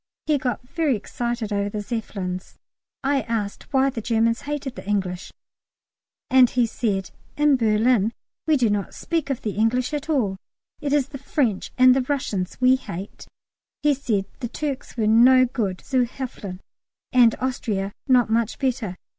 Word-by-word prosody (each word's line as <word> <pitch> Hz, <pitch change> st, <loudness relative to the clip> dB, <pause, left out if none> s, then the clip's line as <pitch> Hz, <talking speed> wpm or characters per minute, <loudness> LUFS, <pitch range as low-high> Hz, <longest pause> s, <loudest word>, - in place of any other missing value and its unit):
He 300 Hz, -2 st, +2 dB
got 245 Hz, -1 st, -3 dB
very 300 Hz, -2 st, +1 dB
excited 235 Hz, 0 st, -3 dB
over 200 Hz, 0 st, 0 dB
the 210 Hz, -, -4 dB
Zeppelins. 195 Hz, -5 st, -5 dB, 0.5 s
I 275 Hz, 0 st, +2 dB
asked 220 Hz, -1 st, -4 dB
why 270 Hz, -1 st, +3 dB
the 235 Hz, -, -5 dB
Germans 230 Hz, +1 st, +1 dB
hated 290 Hz, -3 st, -3 dB
the 215 Hz, -, -10 dB
English, 185 Hz, -3 st, -2 dB, 1.0 s
and 255 Hz, -2 st, +6 dB
he 245 Hz, -1 st, +2 dB
said, 205 Hz, -4 st, -2 dB, 0.3 s
"In 295 Hz, -1 st, +4 dB
Berlin 225 Hz, -1 st, +3 dB, 0.4 s
we 310 Hz, -2 st, +4 dB
do 235 Hz, -5 st, +2 dB
not 205 Hz, -1 st, -2 dB
speak 330 Hz, -4 st, -2 dB
of 270 Hz, -, -2 dB
the 215 Hz, -, -1 dB
English 235 Hz, +7 st, +1 dB
at 295 Hz, +1 st, -3 dB
all(!!!); 220 Hz, -11 st, +1 dB, 0.4 s
it 290 Hz, -2 st, -2 dB
is 280 Hz, -2 st, +2 dB
the 275 Hz, -2 st, -8 dB
French 255 Hz, -7 st, -1 dB
and 255 Hz, 0 st, +7 dB
the 265 Hz, -, +2 dB
Russians 250 Hz, -9 st, -2 dB
we 255 Hz, +1 st, +5 dB
hate." 200 Hz, -5 st, -8 dB, 0.6 s
He 295 Hz, -1 st, +5 dB
said 220 Hz, -8 st, -1 dB
the 245 Hz, -, -3 dB
Turks 280 Hz, -3 st, -5 dB
were 220 Hz, -, +1 dB
no 250 Hz, +4 st, +6 dB
good 215 Hz, -7 st, -2 dB
zu 255 Hz, -3 st, +2 dB
helfen, 210 Hz, -7 st, -7 dB, 0.5 s
and 240 Hz, -3 st, +6 dB
Austria 215 Hz, -7 st, -2 dB, 0.2 s
not 250 Hz, -3 st, +5 dB
much 225 Hz, 0 st, 0 dB
better. 235 Hz, -8 st, -2 dB
240 Hz, 165 wpm, -23 LUFS, 210-265 Hz, 1.0 s, and